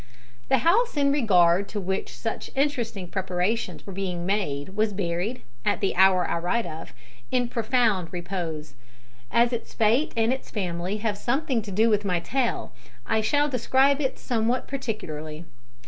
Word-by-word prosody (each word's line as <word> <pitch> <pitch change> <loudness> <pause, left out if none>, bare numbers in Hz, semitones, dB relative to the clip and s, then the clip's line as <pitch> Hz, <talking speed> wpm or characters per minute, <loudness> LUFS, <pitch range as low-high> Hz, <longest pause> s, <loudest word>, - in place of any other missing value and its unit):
The 265 - +5
house 440 +3 +3
in 280 -1 +3
regard 195 -8 +4
to 210 - -3
which 190 0 -3
such - - -4
interesting 240 -9 -1
preparations 190 +4 -2
were 195 - -7
being 180 -2 -3
made 180 -7 -1
was 210 +2 0
buried, 190 +5 -2 0.2
at - - +1
the 195 - 0
hour 185 -1 +5
I - - -1
write 220 +7 0
of, 160 -1 -7 0.4
in 245 -1 +1
profound 225 -6 +1
repose. 175 -5 -4 0.6
As 235 +1 +3
its 235 - -5
fate 230 +7 +3
and 225 +2 +3
its 265 - -6
family 180 -1 -2
have 210 -1 -2
something 265 0 0
to 205 -1 -8
do 215 +4 +3
with 210 -2 +2
my 180 -3 +1
tale, 240 +7 -1 0.3
I 220 - +1
shall 290 +6 +2
describe 270 +2 +3
it 265 -2 -1
somewhat 235 +1 0
particularly. 165 - -5
210 Hz, 160 wpm, -26 LUFS, 180-245 Hz, 0.6 s, The